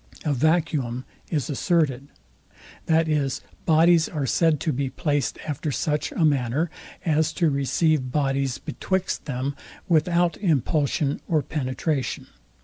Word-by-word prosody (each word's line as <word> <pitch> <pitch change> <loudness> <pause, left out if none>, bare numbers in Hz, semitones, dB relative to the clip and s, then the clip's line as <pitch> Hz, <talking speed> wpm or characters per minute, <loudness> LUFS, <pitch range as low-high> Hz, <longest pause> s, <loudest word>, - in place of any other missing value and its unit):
A 150 - +2
vacuum 145 -4 +1 0.2
is 150 -6 -1
asserted: 145 -3 0 0.8
That 160 0 +3
is, 145 -3 0 0.3
bodies 165 +1 +5
are 150 -5 -2
said 160 +3 +2
to 155 - 0
be 135 +1 -1
placed 145 0 -1
after 150 0 -2
such 150 +2 -1
a 165 - +2
manner, 145 +2 +1 0.3
is 160 -1 +2
to 165 -4 +2
receive 140 0 +1
bodies 135 -2 0
betwixt 190 -1 -2
them, 135 0 -3 0.3
without 170 +1 +2
impulsion 150 - +1
or 155 -3 +2
penetration. 135 0 -2
150 Hz, 125 wpm, -24 LUFS, 135-160 Hz, 0.8 s, bodies